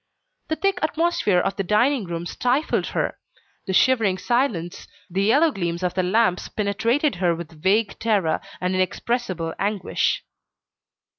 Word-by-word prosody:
The 315 - -1
thick 390 +1 0
atmosphere 315 - +1
of 180 - 0
the 195 - 0
dining 225 +5 +2
room 170 -1 -4
stifled 250 - 0
her; - - -2 0.5
the 190 - -1
shivering 220 -4 +3
silence, 205 -6 -1 0.2
the 190 +3 0
yellow 285 +11 +4
gleams 175 -5 -3
of 180 - 0
the 185 - +1
lamp 185 0 +2 0.2
penetrated 220 - +1
her 175 -2 +2
with 165 -2 -10
vague 205 +3 +1
terror, 200 -8 +1 0.2
and 180 +1 -1
inexpressible 185 -2 -1
anguish. 200 -1 0
200 Hz, 140 wpm, -23 LUFS, 180-245 Hz, 0.5 s, yellow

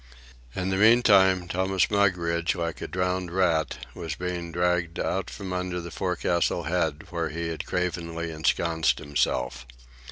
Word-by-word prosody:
In 95 0 -1
the 95 - +1
meantime 100 -5 +5
Thomas 95 +2 +1
Mugridge, 90 -4 +1
like 85 -5 -3
a - - -3
drowned 90 0 -1
rat, 80 -7 0
was 80 -4 -5
being 90 -1 -4
dragged 90 0 0
out 95 -2 -1
from 95 -3 -6
under 90 -1 -2
the 85 0 -7
forecastle 90 -1 0
head 80 -2 -1
where 85 -2 -2
he 85 +1 -3
had 80 - -5
cravenly 85 -2 -2
ensconced 80 +1 +1
himself. 65 -4 -1
85 Hz, 140 wpm, -26 LUFS, 85-90 Hz, -, meantime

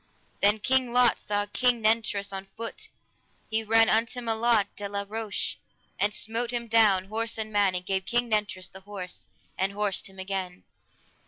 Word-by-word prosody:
Then 205 +2 +5
King 255 +1 +1
Lot 245 -1 +4
saw 205 0 -1
King 245 +3 +2
Nentres 215 -2 +1
on 195 0 -5
foot, 330 - -4 0.6
he 220 0 +1
ran 225 +1 +5
unto 230 +2 +2
Melot 225 -2 +2
de 205 -1 -5
la 200 0 -2
Roche, 220 -1 -3 0.4
and 205 - +2
smote 225 +3 -1
him 240 -1 -1
down, 215 -5 +4
horse 225 +3 -2
and 215 -1 -3
man, 200 -2 +3
and 180 0 -3
gave 190 0 0
King 240 +5 +1
Nentres 210 -4 -1
the 190 - -10
horse, 190 -2 -8 0.3
and 195 +1 0
horsed 205 -2 0
him 190 - -18
again. 190 -1 -4
210 Hz, 170 wpm, -27 LUFS, 195-230 Hz, 0.6 s, Then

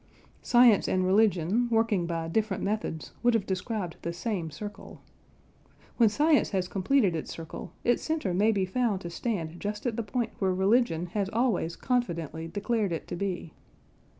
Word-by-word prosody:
Science 240 -4 +5
and 185 0 +1
religion 200 +3 +3
working 225 -6 +2
by 165 -1 -2
different 210 +2 -1
methods 200 -6 -3
would 240 -1 +3
have 210 -4 +1
described 190 -1 -3
the 170 - -3
same 175 -1 -3
circle. 205 +6 -9 1.0
When 230 -3 +6
science 295 +7 +3
has 185 -3 -1
completed 195 0 +2
its 160 - -4
circle, 165 -1 -7
its 240 - +2
centre 315 - -1
may 210 +5 +3
be 195 -3 +1
found 210 -1 0
to 170 - -6
stand 170 -5 -3
just 210 +2 -4
at 235 -3 -1
the - - +1
point 230 +1 -2
where 190 -2 +1
religion 190 -3 +2
has 200 -2 0
always 220 -8 0
confidently 170 - -2
declared 205 +3 -1
it 165 - -4
to - - -3
be. 175 -3 -4
200 Hz, 165 wpm, -28 LUFS, 175-230 Hz, 1.0 s, When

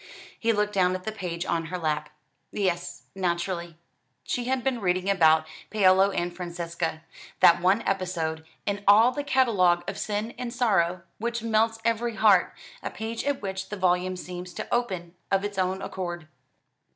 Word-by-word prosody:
He 230 - +2
looked 210 -1 0
down 185 -2 +3
at 185 - -6
the 220 - -3
page 180 -4 -4
on 165 -2 -1
her 180 +3 -4
lap. 150 -3 -1 0.4
"Yes, 180 -3 -2
naturally." 175 -2 -2 0.5
She 245 - -2
had 260 0 0
been 260 -4 0
reading 185 0 0
about 160 -4 +5 0.2
Paolo 195 -2 +5
and 175 -2 -2
Francesca 170 -2 -4 0.4
that 170 0 +6
one 190 +5 +3
episode, 170 -5 -2 0.2
in 205 0 -2
all 220 +5 +7
the 285 +3 -3
catalogue 190 -11 +3
of 195 - -4
sin 215 +2 -2
and 250 -1 -4
sorrow, 190 -8 +1 0.2
which 235 +1 -2
melts 225 0 +2
every 230 0 0
heart; 215 -1 +4 0.3
a - - -3
page 225 +1 -5
at 280 -5 -1
which 190 -1 -4
the 210 - -5
volume 185 0 +1
seems 180 0 -7
to - - -5
open 185 -8 -1 0.2
of 195 +1 +1
its 205 -2 -4
own 185 +1 0
accord. 175 -3 -5
190 Hz, 165 wpm, -26 LUFS, 175-220 Hz, 0.5 s, all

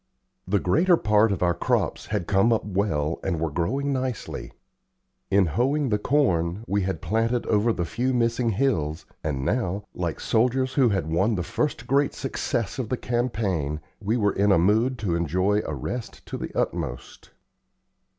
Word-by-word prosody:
The 100 +2 +2
greater 165 - +3
part 105 -1 +3
of 95 -3 -1
our 85 -1 +3
crops - - -1
had 85 - -2
come 100 +6 +3
up 115 - +1
well 90 -6 -1
and 90 -4 -1
were 80 -1 -1
growing 135 - -1
nicely. 130 -3 -4 0.8
In 100 0 +4
hoeing 130 - +1
the 105 -1 +1
corn, 100 - +1
we 100 +1 +1
had 95 0 -3
planted 115 +2 0
over 110 +2 +2
the 90 -6 -1
few 120 +7 -1
missing 120 -1 +1
hills, 95 - 0 0.2
and 70 -4 -2
now, 100 -3 -1
like - - -3
soldiers 130 +3 +1
who 130 -4 +4
had 95 -5 0
won 95 +8 +1
the 90 - -1
first 150 - -2
great 140 +1 +2
success 125 -3 -2
of 120 -4 -3
the 125 - 0
campaign, 105 - -1 0.2
we 110 +4 0
were 105 -3 +2
in 100 +1 +2
a 95 - +5
mood 110 +9 +2
to 105 -6 -1
enjoy 90 +5 +1
a - - -3
rest 120 -2 -6
to - - -6
the - - -4
utmost. - - -3
105 Hz, 170 wpm, -25 LUFS, 90-125 Hz, 0.8 s, a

